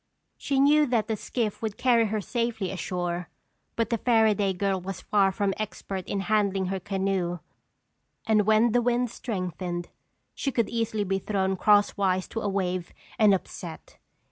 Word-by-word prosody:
She 275 -1 -1
knew 295 +2 +5
that 235 -4 +1
the 220 - 0
skiff 215 0 -3
would 220 -2 -3
carry 235 -3 +3
her 215 0 -2
safely 230 -3 -2
ashore 175 -1 -3 0.5
but 230 0 -1
the 230 - +1
Fairaday 220 -4 +3
girl 195 -1 0
was 185 0 -5
far 195 -2 +2
from 200 0 0
expert 195 -3 -5
in 200 - -2
handling 200 -2 +1
her 190 - -2
canoe 190 -2 -1 0.9
and 215 -2 +3
when 220 +2 +4
the 245 +2 +3
wind 245 0 +1
strengthened, 180 - -4 0.4
she 275 - -2
could 235 -3 0
easily 225 -2 -1
be 195 0 -1
thrown 190 -1 0
crosswise 195 -2 +3
to 225 - -3
a 205 - -1
wave 185 -3 -2 0.3
and 215 -2 +6
upset. 175 -3 -4
205 Hz, 160 wpm, -27 LUFS, 190-225 Hz, 0.9 s, and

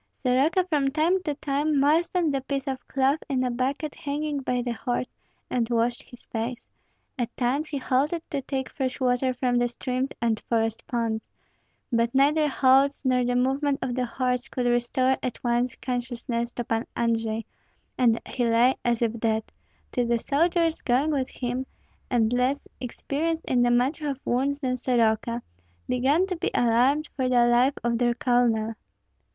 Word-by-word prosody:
Soroka 275 +8 +3
from 295 -6 +1
time 325 +6 +2
to 300 -5 -2
time 290 +1 0
moistened 320 +2 +2
the 270 - 0
piece 275 0 -3
of 265 -2 -5
cloth 275 +3 +2
in 260 -2 +1
a 250 - 0
bucket 275 +5 -2
hanging 290 0 -3
by 250 -2 -1
the 245 - -2
horse, 245 +1 -2 0.4
and 235 -2 -1
washed 235 0 +1
his 245 - -14
face; 230 +2 -4 0.5
at 240 -1 -3
times 265 +5 0
he 295 - -3
halted 285 +6 0
to 285 -3 -1
take 265 0 -3
fresh 260 -1 -3
water 255 0 +2
from 250 -1 0
the 245 - +2
streams 255 +2 -3
and 225 -2 +1
forest 225 -1 0
ponds; 230 -2 -2 0.6
but 235 +2 +1
neither 300 +3 +4
halts 275 +1 +3
nor 255 -1 +3
the 245 0 0
movement 270 +3 +1
of 250 - -2
the 250 0 -1
horse 250 +1 -1
could 250 -2 -3
restore 245 +2 +2
at 250 - -4
once 240 0 +1
consciousness 240 -1 -3
to 240 - -3
Pan 225 0 -2
Andrei, 225 -1 0 0.5
and 235 -3 +3
he 250 - -2
lay 235 +3 +4
as 240 -1 +1
if 230 0 -1
dead, 220 -1 +1 0.5
till 245 -1 0
the 235 0 +2
soldiers 330 +5 +1
going 265 +5 +2
with 270 -3 -1
him, 255 +1 -3 0.4
and 235 -2 +2
less 255 +3 0
experienced 305 +6 -3
in 250 -1 +2
the 245 - +4
matter 265 +5 +1
of 275 -1 -6
wounds 280 +4 0
than 255 -2 0
Soroka, 235 -1 +1 0.4
began 270 +8 +2
to 375 -1 -3
be - - -1
alarmed 250 +6 +3
for 260 -2 0
the 245 -1 +4
life 245 +3 +3
of 235 -1 0
their 240 -1 +2
colonel. 235 -3 +2
255 Hz, 170 wpm, -26 LUFS, 240-280 Hz, 0.6 s, neither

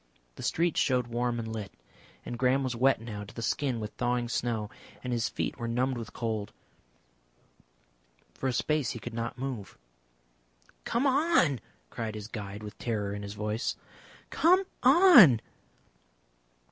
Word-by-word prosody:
The - - -11
street 170 0 0
showed 125 -2 +2
warm 120 0 -1
and 115 -1 -4
lit, 105 -3 -5 0.5
and 120 - -5
Graham 130 +2 +3
was 130 -2 -2
wet 130 +2 +3
now 110 -3 -6
to 100 - -12
the 115 - -5
skin 130 -1 0
with 105 -1 -5
thawing 120 -1 0
snow, 115 -3 -2 0.3
and 125 -1 -2
his 115 -2 0
feet - - -3
were 120 - -3
numbed 125 +3 0
with 115 - -7
cold. 110 -3 -3 1.8
For 135 - -3
a - - -1
space 140 +2 0
he 120 - -7
could 115 +2 -7
not 115 +1 -4
move. 125 -7 -5 1.1
"Come 235 +4 0
on!" 275 - +3 0.3
cried 110 -2 -4
his 105 -1 -6
guide, 105 -2 -7
with 105 0 -9
terror 105 -4 -2
in 100 - -5
his 100 0 -7
voice. 105 +2 -2 0.6
"Come 365 +4 +4 0.2
on!" 260 - +8
120 Hz, 155 wpm, -29 LUFS, 110-135 Hz, 1.8 s, on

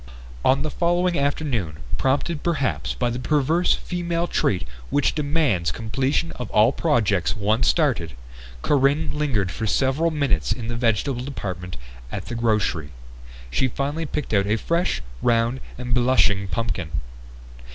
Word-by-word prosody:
On 135 +2 +3
the 155 - -2
following 175 +1 +1
afternoon 135 - -1 0.2
prompted 145 +4 0
perhaps 155 -6 -1
by 120 -1 0
that 125 +2 -4
perverse 155 +5 +2
female 175 -1 -2
trait 95 - 0 0.2
which 145 - +2
demands 145 - +1
completion 130 - -1
of 125 -4 -5
all 110 +4 +5
projects 110 - +1
once 105 +2 +2
started 125 - +1 0.5
Corinne 145 +2 +2
lingered 125 -12 0
for 110 +4 -3
several 135 - +2
minutes 140 - 0
in 115 -2 -2
the 120 - -2
vegetable 120 +2 0
department 90 - -5 0.3
at - - -5
the - - -6
grocery. 105 -9 0 0.6
She 130 - +2
finally 145 +5 -2
picked 145 -4 -4
out 100 -1 +3
a 105 - +2
fresh, 170 - 0 0.2
round 115 +2 +2 0.2
and 125 0 -4
blushing 120 -5 +3
pumpkin. 95 -6 -2
125 Hz, 140 wpm, -23 LUFS, 105-150 Hz, 0.6 s, all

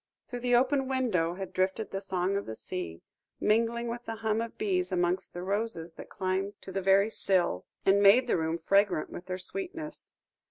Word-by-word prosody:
Through 245 - -5
the 245 0 +2
open 265 +2 +3
window 220 -11 +1
had 190 0 -6
drifted 190 +4 0
the 195 - -3
song 190 0 -1
of 200 - -2
the 110 - -5
sea, 85 -5 -5 0.4
mingling 230 +2 +2
with 240 +1 -5
the 225 - -4
hum 220 0 0
of 230 0 -6
bees 185 -3 0
amongst 175 0 0
the 175 - -4
roses 195 -4 -2
that - - -10
climbed 190 +1 -2
to 190 - -7
the 195 +1 -2
very 195 +3 +4
sill, 180 - +1 0.2
and 195 +1 +5
made 205 +6 +7
the - - +1
room 160 0 0
fragrant 195 0 +2
with 175 - -8
their 185 0 -2
sweetness. 325 - -6
195 Hz, 195 wpm, -30 LUFS, 180-230 Hz, 0.4 s, made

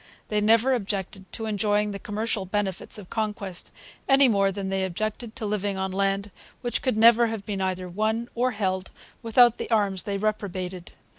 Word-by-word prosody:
They 210 -1 +1
never 230 +5 +4
objected 195 -4 -3
to 225 - -3
enjoying 210 0 +1
the 200 - -5
commercial 215 -1 -2
benefits 195 -1 -2
of 200 -4 -11
conquest; 210 -4 -2 0.4
any 270 0 +7
more 200 -4 +3
than 195 0 -4
they 190 0 0
objected 215 +5 -3
to 220 - -4
living 205 -1 -1
on 190 0 -2
land 195 +1 0 0.3
which 240 - -1
could 255 -5 0
never 235 +1 +7
have 220 -3 -5
been 200 -2 -3
either 185 -1 -2
won 215 +5 -1
or 250 +2 +1
held 190 -5 -2 0.3
without 240 0 +5
the - - -4
arms 200 -5 +2
they 200 +3 -2
reprobated. 190 -4 -3
205 Hz, 175 wpm, -26 LUFS, 190-220 Hz, 0.4 s, any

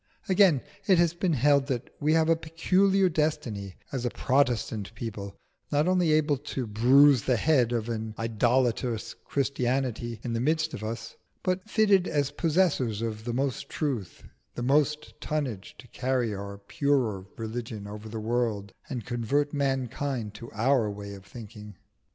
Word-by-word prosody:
Again, 185 -7 +5 0.3
it 190 -3 +6
has 170 -1 +3
been 175 0 0
held 140 +1 +3
that 125 -4 -3
we 150 +2 +2
have 160 -1 +3
a 165 - +5
peculiar 185 +4 +2
destiny 120 - -2 0.2
as 130 -3 -3
a 120 - +1
Protestant 120 -6 0
people, 100 -3 -6 0.4
not 150 +2 +2
only 180 -3 +3
able 150 -2 +3
to 135 -2 -4
bruise 125 +5 +5
the 125 +1 +1
head 130 -4 +3
of 115 -2 -1
an 110 -2 -4
idolatrous 115 0 0
Christianity 125 -4 -1
in 120 - -3
the 115 - 0
midst 155 +4 +1
of 110 - -6
us, 115 +1 -5 0.3
but 185 +3 -1
fitted 205 -4 +4
as 145 -2 0
possessors 150 - +1
of 110 -1 -4
the 120 - -2
most 135 +1 -2
truth 130 - -3
and - - -16 0.2
the 120 - -3
most 150 +3 +1
tonnage 130 -11 -3
to 125 - -13
carry 125 -3 -1
our 100 0 -6
purer 110 -2 0
religion 110 -2 -5
over 105 +1 -8
the 110 0 -5
world 110 -3 -1 0.2
and 120 -5 -4
convert 135 +5 0
mankind 135 -4 -1
to 115 +3 -9
our 115 0 +2
way 100 0 -7
of 95 -1 -11
thinking. 105 -2 -10
125 Hz, 160 wpm, -28 LUFS, 110-150 Hz, 0.4 s, it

